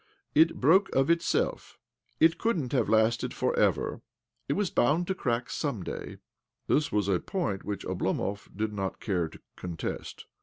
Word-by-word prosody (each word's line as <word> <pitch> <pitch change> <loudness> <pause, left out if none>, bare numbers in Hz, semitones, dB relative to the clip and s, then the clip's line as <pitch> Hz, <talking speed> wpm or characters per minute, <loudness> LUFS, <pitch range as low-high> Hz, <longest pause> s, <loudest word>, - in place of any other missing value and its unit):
" - - -50
It 165 +1 +3
broke 185 +9 +5
of 135 +4 +4
itself. 170 0 0 0.4
It 165 +1 +4
couldn't 170 - 0
have 125 -7 +1
lasted 110 +1 +2
for - - 0
ever. - - +1 0.5
It - - +3
was 200 -3 0
bound 155 +8 +2
to 190 - -1
crack 125 -9 -2
some - - -2
day." - - -6 0.5
This 150 0 +1
was 105 -2 +1
a 95 -3 +2
point 105 - -2
which 105 -2 -4
Oblomov 100 +1 -2
did 110 0 -1
hot 95 -2 -3
care 90 -6 0
to - - -13 0.2
contest. 85 -2 -5
120 Hz, 165 wpm, -29 LUFS, 100-165 Hz, 0.5 s, broke